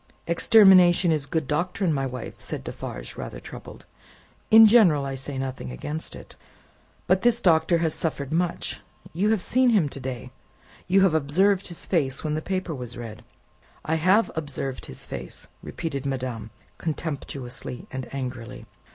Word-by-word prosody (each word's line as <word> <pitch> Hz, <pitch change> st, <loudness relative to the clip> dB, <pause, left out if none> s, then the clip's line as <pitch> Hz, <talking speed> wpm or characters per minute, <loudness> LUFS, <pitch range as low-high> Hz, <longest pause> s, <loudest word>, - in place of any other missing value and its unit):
"Extermination 180 Hz, -1 st, +6 dB
is 150 Hz, -3 st, 0 dB
good 155 Hz, 0 st, -1 dB
doctrine, 175 Hz, +4 st, 0 dB
my 135 Hz, -2 st, -1 dB
wife," 125 Hz, -2 st, -7 dB
said -, -, -5 dB
Defarge, -, -, -7 dB
rather -, -, -6 dB
troubled; -, -, -11 dB, 0.6 s
"in 225 Hz, 0 st, +9 dB
general, 195 Hz, -11 st, +5 dB
I 135 Hz, -, -3 dB
say 135 Hz, +1 st, -5 dB
nothing 130 Hz, -, -4 dB
against 150 Hz, -, -5 dB
it. -, -, -12 dB, 0.7 s
But 185 Hz, +1 st, +2 dB
this 240 Hz, -1 st, +3 dB
Doctor 170 Hz, -3 st, +3 dB
has 165 Hz, -2 st, 0 dB
suffered 145 Hz, -4 st, -3 dB
much; 175 Hz, +1 st, -1 dB, 0.3 s
you 195 Hz, +6 st, +1 dB
have 220 Hz, -5 st, +1 dB
seen 255 Hz, 0 st, +3 dB
him 205 Hz, -10 st, +3 dB
to 140 Hz, -, -8 dB
day; 125 Hz, -3 st, -6 dB, 0.6 s
you 195 Hz, +2 st, +4 dB
have 190 Hz, -4 st, +4 dB
observed 180 Hz, +7 st, +2 dB
his 170 Hz, -, -7 dB
face 140 Hz, -7 st, 0 dB
when 155 Hz, -1 st, -1 dB
the 155 Hz, -, -1 dB
paper 185 Hz, -1 st, -3 dB
was 125 Hz, -3 st, -7 dB
read." 115 Hz, -3 st, -8 dB, 0.6 s
"I 160 Hz, -, 0 dB
have 185 Hz, +7 st, +3 dB
observed 145 Hz, -4 st, -4 dB
his 65 Hz, -, -8 dB
face!" -, -, -6 dB, 0.2 s
repeated 140 Hz, -4 st, -4 dB
madame, 125 Hz, -4 st, -4 dB, 0.3 s
contemptuously 140 Hz, -6 st, -5 dB
and 130 Hz, -1 st, -6 dB
angrily. 125 Hz, -3 st, -6 dB
155 Hz, 155 wpm, -25 LUFS, 130-180 Hz, 0.7 s, in